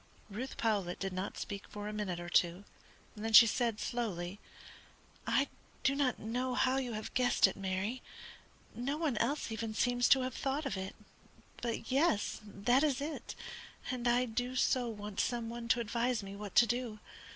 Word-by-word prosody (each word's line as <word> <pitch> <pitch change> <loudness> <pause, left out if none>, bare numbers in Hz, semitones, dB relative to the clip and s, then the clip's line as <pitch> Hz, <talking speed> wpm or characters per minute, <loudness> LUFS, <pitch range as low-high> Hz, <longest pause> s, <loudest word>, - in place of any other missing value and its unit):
Ruth 245 +6 -5
Powlett 200 -6 0
did 195 -1 -3
not 185 +2 -4
speak 200 0 -5
for 205 0 -6
a 210 - -4
minute 200 -5 -2
or 175 - -6
two, 175 +2 +2 0.5
then 220 +1 -3
she 230 - +12
said, 230 -1 0
slowly: 200 -5 -3 0.9
"I - - +3 0.4
do 275 - +4
not 275 -3 +1
know 250 +3 -2
how 260 +1 +3
you 250 -3 -2
have 215 0 -5
guessed 250 -1 +4
it, - - +1
Mary. 195 +5 -2 0.7
No 275 +5 -2
one 310 -6 0
else 285 -2 0
even 220 -1 -3
seems 245 +1 +2
to 265 - +7
have 255 -1 -2
thought 280 +5 -2
of 270 - -1
it. 190 0 -5 0.7
But, 235 0 -3
yes, 270 -7 +2
that 210 +5 +2
is 285 -4 +2
it, 295 +2 -5 0.6
and 250 -1 -2
I 245 +1 +4
do 245 +2 -2
so 255 -1 +2
want 210 -2 -6
some 235 -2 0
one 235 0 -6
to 230 - +3
advise 235 0 0
me 195 0 -7
what 205 -1 -7
to 240 - +8
do. 240 -1 -2
235 Hz, 180 wpm, -34 LUFS, 205-255 Hz, 0.9 s, she